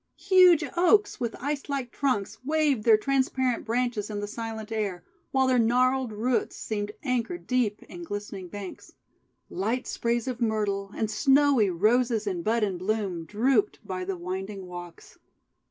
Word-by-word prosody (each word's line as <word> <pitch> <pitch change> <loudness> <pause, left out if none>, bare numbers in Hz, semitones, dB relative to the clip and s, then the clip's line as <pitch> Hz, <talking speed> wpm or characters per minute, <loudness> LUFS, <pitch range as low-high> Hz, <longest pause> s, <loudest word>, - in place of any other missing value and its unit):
Huge 365 -4 +6
Oaks, 410 +4 +3
with 235 -2 -2
ice 285 +2 -3
like 270 -4 -2
trunks, 225 -6 -1
waved 290 -5 +1
their 225 -2 +7
transparent 260 0 0
branches 230 -3 -1
in 205 -1 -3
the 205 - -3
silent 220 0 -6
air; 200 -5 -2 0.3
while 265 0 +2
their 255 -1 +3
gnarled 250 +2 +2
roots 230 +4 -1
seemed 210 -1 -3
anchored 255 +5 -2
deep 245 -5 0
in 175 - -10
glistening 205 0 -6
banks. 195 +1 -9 0.5
Light 225 +7 -2
sprays 235 0 -1
of 250 -1 -4
Myrtle, 205 -3 -1
and 220 -1 -1
snowy 270 -5 +4
Roses 220 +5 +2
in 185 -4 -2
bud 225 +5 +1
and 190 -4 -1
bloom, 190 -4 -2
drooped 220 +4 +1
by 185 -1 -4
the 185 0 -3
winding 190 +2 -5
walks. 175 -1 -10
225 Hz, 155 wpm, -27 LUFS, 205-255 Hz, 0.5 s, their